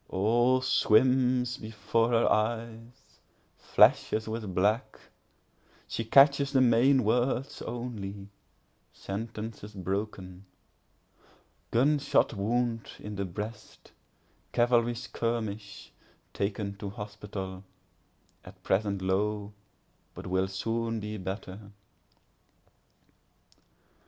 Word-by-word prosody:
All 120 +6 +2
swims 125 0 +3
before 110 +1 -1
her 115 -1 +3
eyes—flashes 115 0 0
with 110 -4 -4
black—she 110 +2 -4
catches 140 +3 +5
the 135 - +3
main 130 +2 +4
words 125 +4 0
only; 105 -5 -6 0.6
Sentences 105 0 -6
broken—gun 100 +7 -4
shot 140 -3 +2
wound 115 +2 -1
in 105 0 -7
the 100 0 -2
breast, 105 +5 -8 0.6
cavalry 120 0 +3
skirmish, 110 -3 -4 0.4
taken 100 0 -2
to 100 -1 -5
hospital, 100 -2 -7 0.8
At - - -15
present 100 -1 0
low, 105 +2 -1 0.6
but - - -9
will 95 +1 0
soon 115 +4 -2
be 105 0 -5
better. 95 +1 -7
110 Hz, 80 wpm, -29 LUFS, 100-120 Hz, 0.8 s, catches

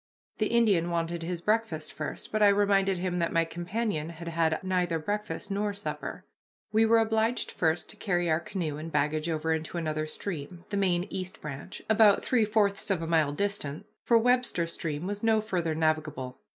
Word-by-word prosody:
The 215 - +2
Indian 205 -8 +3
wanted 170 0 -1
his 170 0 -3
breakfast 210 -7 0
first, 150 - -5
but 215 - 0
I 205 - +8
reminded 200 -1 +3
him 180 0 -1
that 170 - 0
my 165 0 +2
companion 175 0 -2
had 170 0 -7
had 160 -1 +1
neither 180 -3 +1
breakfast 205 +4 -3
nor 205 +1 -1
supper. 200 - -5 0.5
We 220 +1 +4
were 230 +1 +5
obliged 225 +1 +1
first 160 0 0
to - - -13
carry 175 -3 0
our 160 0 +2
canoe 170 -4 -3
and 160 +2 -6
baggage 155 +2 0
over 160 0 0
into 160 +2 -3
another 155 -2 -2
stream, 170 0 -5
the - - -1
main 180 -3 +2
East 185 0 -4
Branch, 150 +6 -7
about 215 -2 +5
three 235 -4 +3
fourths 210 -1 +1
of 185 -4 +1
a - - -3
mile 160 -3 +3
distant, 155 -4 -2 0.2
for 235 - +5
Webster 245 -7 +2
Stream 165 -1 -4
was 205 +1 -3
no 225 -1 +3
farther 175 -7 -1
navigable. 155 -5 -1
175 Hz, 185 wpm, -29 LUFS, 160-205 Hz, 0.5 s, I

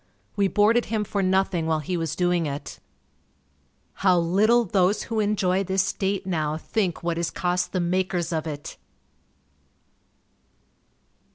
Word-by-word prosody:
We 200 -1 +2
boarded 220 +4 +3
him 220 -2 -1
for 205 -1 -2
nothing 190 -3 +1
while 160 -1 +2
he 155 +4 -3
was 165 -3 -2
doing 175 -2 +1
it. 140 0 -6 1.2
How 185 -2 +4
little 210 +8 +3
those 195 +1 +1
who 225 -1 -3
enjoy 195 -3 +1
this 190 0 +1
state 195 0 -2
now 155 -4 -1
think 180 -1 -2
what 170 -1 -1
is 170 - -1
cost 180 0 -1
the 185 - -1
makers 180 -1 -1
of 160 0 -2
it! 145 -2 -7
185 Hz, 140 wpm, -24 LUFS, 170-200 Hz, 1.2 s, How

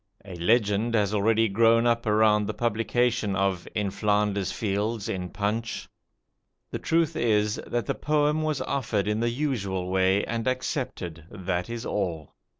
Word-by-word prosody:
A 95 -3 -8
legend 110 +4 +2
has 105 -2 +1
already 110 +2 +3
grown 115 +3 +4
up 115 -1 +1
around 105 -1 +3
the - - -3
publication 115 -2 0
of 95 -2 0
"In 105 -2 0
Flanders 105 -1 0
Fields" 105 +1 -2
in 90 -1 -3
'Punch'. 110 +5 -3 0.8
The - - -3
truth 165 -1 +1
is, 105 -2 +1
"that 120 -3 -1
the - - 0
poem 150 +1 +1
was 155 -2 -1
offered 110 -7 -1
in 105 +1 0
the 120 +1 +1
usual 100 -9 -2
way 95 +1 +2
and 115 +1 -3
accepted; 125 - -3
that 95 -1 -3
is 115 -1 -5
all." 85 -7 -3
105 Hz, 150 wpm, -26 LUFS, 100-120 Hz, 0.8 s, grown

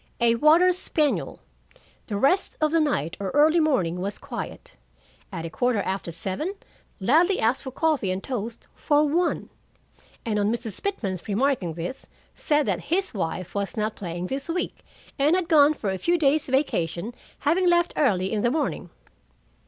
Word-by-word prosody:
"A 235 -1 +4
water 315 +8 +5
spaniel. 310 -4 -1 0.7
'The 205 - -2
rest 320 - +2
of 310 -1 +2
the 330 - +3
night, 225 - 0
or 195 -1 -2
early 310 +3 +5
morning, 190 - +1
was 200 +3 -3
quiet. - - -7 0.6
At 165 - -5
a - - -4
quarter 245 +2 +1
after 190 -3 -2
seven, 195 - -4 0.4
Ladley 325 - +3
asked 230 +4 +1
for 265 - -6
coffee 300 - 0
and 185 +1 -2
toast 235 -3 -5
for 295 0 +2
one, 345 +4 0 0.7
and 215 -2 0
on 205 +1 +2
Mrs. 230 -4 -4
Pitman 210 - -2
remarking 210 - 0
this, 175 +11 -6 0.3
said 295 -2 +1
that - - -2
his 375 +2 0
wife 185 -2 -3
was 200 +2 -3
not 215 0 -1
playing 175 -2 -5
this 270 - -4
week, 355 +2 -3 0.4
and 295 +5 +4
had 365 -2 0
gone 305 -2 +5
for 205 -8 -2
a 190 - -3
few 345 - +2
days' 300 -1 +2
vacation, 230 - -1 0.3
having 350 +5 +3
left 345 0 +3
early 195 -10 +1
in 210 - 0
the 240 - +2
morning.' 300 +3 -2
260 Hz, 170 wpm, -25 LUFS, 195-310 Hz, 0.7 s, water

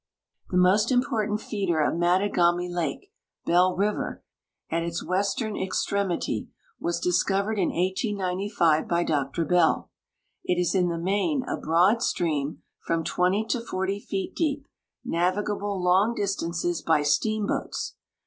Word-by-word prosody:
The 180 - 0
most 195 +6 +4
important 230 -5 +1
feeder 195 -8 -1
of 150 - +2
Mattagami 175 0 +2
lake. 175 - -3 0.3
Bell 180 +2 +3
river, 205 +3 -1 0.5
at 165 - +1
its 170 0 -3
western 205 +4 -1
ex 190 0 -1
tremity, 200 -3 -1 0.3
was 340 +1 -1
discovered 210 - +1
in 180 - +2
bSi).: 185 -3 0
by 170 0 +1
Dr 145 +1 -1
Bell. 180 +3 +2 0.5
It 180 0 0
is 180 - +1
in 180 -2 +2
the 170 - -2
main 205 - 0
a - - -3
broad 180 +8 +3
stream, 155 - -1 0.2
from 165 -1 0
20 185 +6 +1
to 245 - 0
40 195 -2 -2
feet 195 -1 -4
deep, 290 -4 -1 0.4
navigable 200 +3 -1
long 190 +6 +3
distances 175 -4 -1
by 155 -2 +2
steamboats. 210 +9 -1
185 Hz, 130 wpm, -26 LUFS, 175-210 Hz, 0.5 s, most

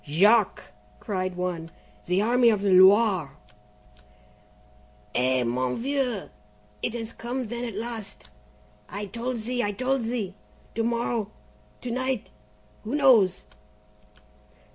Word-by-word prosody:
"Jacques!" 205 +8 +3 0.3
cried 185 -2 -3
one. 175 -2 -3 0.4
"The 180 +3 +2
Army 240 +1 +4
of 210 -3 +1
the 200 - +2
Loire!" 185 -5 +5 1.8
"Eh! 130 0 +2
mon 125 +1 -1
vieux, 255 -5 -1 0.5
it - - -2
has 225 -1 -5
come 240 0 -4
then 240 +1 -4
at 230 -4 -6
last! 220 -2 -6 0.6
I 205 0 -5
told 235 +5 -4
thee! 245 +2 -2
I 205 - 0
told 255 +5 0
thee! 225 -4 -3 0.4
To 230 - -1
morrow 235 -2 -1 0.5
to 245 - -4
night 255 -1 -2 0.5
who 225 +6 -3
knows?" 235 -11 +4
220 Hz, 120 wpm, -26 LUFS, 185-240 Hz, 1.8 s, Loire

